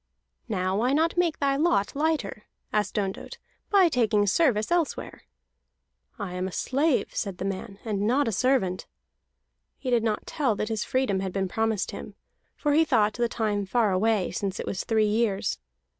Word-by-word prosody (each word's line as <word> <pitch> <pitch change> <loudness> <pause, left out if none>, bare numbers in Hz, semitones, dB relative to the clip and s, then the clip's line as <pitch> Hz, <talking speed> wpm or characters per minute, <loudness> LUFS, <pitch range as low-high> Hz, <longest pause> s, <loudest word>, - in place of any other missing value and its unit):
"Now, 185 -2 0
why 250 +4 +2
not 325 +3 +2
make 345 -3 +1
thy 275 -1 +1
lot 290 - +1
lighter," 290 -9 -1 0.3
asked 210 0 0
Ondott, 195 -2 -3 0.3
"by 390 -3 +6
taking 220 -8 +2
service 215 - +2
elsewhere?" 345 -3 -1 0.9
"I 200 -4 -5
am 180 +1 -2
a - - -6
slave," 275 - 0
said 195 -4 -3
the 185 - -4
man, 195 0 -4
"and 205 -3 -1
not 270 +4 +2
a - - +1
servant." 205 -5 +1 0.9
He 255 - -4
did 240 -2 +4
not 220 -1 -1
tell 265 -8 0
that 215 +2 -3
his 220 -2 -1
freedom 255 -7 0
had 190 -1 -3
been 190 0 -1
promised 220 +1 -1
him, - - -8 0.4
for 295 -1 0
he 320 +2 +5
thought 220 -9 +2
that 240 +1 0
time 210 -3 -1
far 225 -1 +2
away, 205 +1 +1
since 195 +2 -3
it - - -3
was 190 - -3
three 220 -2 +2
years. 210 -2 0
220 Hz, 175 wpm, -26 LUFS, 195-270 Hz, 0.9 s, by